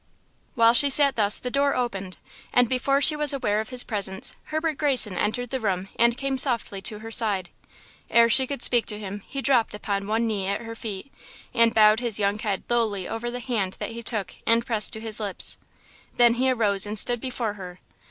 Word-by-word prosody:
While 230 -1 +4
she 280 +4 +6
sat 280 0 +5
thus 210 -2 +6
the 250 - 0
door 280 +1 0
opened, 195 -7 -4 0.3
and 245 -1 +3
before 275 +3 0
she 305 - +8
was 300 -1 0
aware 215 -6 -1
of 220 - -10
his 250 -1 0
presence, 195 -3 -2
Herbert 315 -1 -3
Greyson 260 -10 +3
entered 240 +6 -3
the 265 - -2
room 195 -4 -3
and 235 +1 +2
came 270 0 -3
softly 235 -7 -1
to 210 +2 -3
her 225 - -8
side. 200 -6 +1 0.6
Ere 235 0 +4
she 260 +3 +4
could 280 -3 -5
speak 240 -2 +3
to 210 - -1
him 205 -1 -8
he 275 -1 -6
dropped 245 -6 +1
upon 200 -1 -4
one 225 +2 -1
knee 205 -4 -3
at 200 +2 -2
her 230 -1 -8
feet 220 +3 -8 0.4
and 230 -1 +4
bowed 215 0 +5
his 235 -4 +2
young 205 0 -1
head 205 -3 -3
lowly 220 -6 -1
over 235 +2 -5
the 245 +1 -6
hand 220 -7 -3
that - - -6
he 230 +1 -8
took 210 -5 -5
and 230 +1 +2
pressed 220 -3 -1
to 220 - -3
his 220 -1 -3
lips. 205 -3 -2 0.6
Then 240 -1 +4
he 255 +2 0
arose 210 -5 +1
and 210 +1 -3
stood 240 +2 0
before 245 -4 -4
her. 180 -3 -11
230 Hz, 210 wpm, -24 LUFS, 205-250 Hz, 0.6 s, she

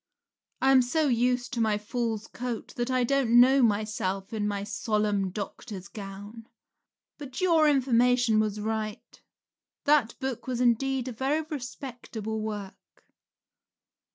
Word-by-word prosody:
I 265 - +5
am 265 -1 +7
so 300 +5 +1
used 245 +1 +1
to 235 - -1
my 215 -2 +2
fool's 225 0 -3
coat 245 -1 -6
that 240 +1 -2
I 255 -1 +2
don't 240 -2 +4
know 265 +2 +6
myself 205 -3 0
in 210 -1 -1
my 200 -1 -2
solemn 205 -1 0
doctor's 200 0 -7
gown. 205 +2 -9 0.7
But 275 -3 -7
your 330 -5 +4
information 245 -4 +3
was 215 -1 0
right; 215 0 -4 0.6
that 285 -6 +3
book 265 -3 -4
was 250 -2 -2
indeed 250 +2 +1
a - - -3
very 270 +6 0
respectable 245 -6 -6
work. 210 -3 -8
235 Hz, 130 wpm, -28 LUFS, 210-260 Hz, 0.7 s, am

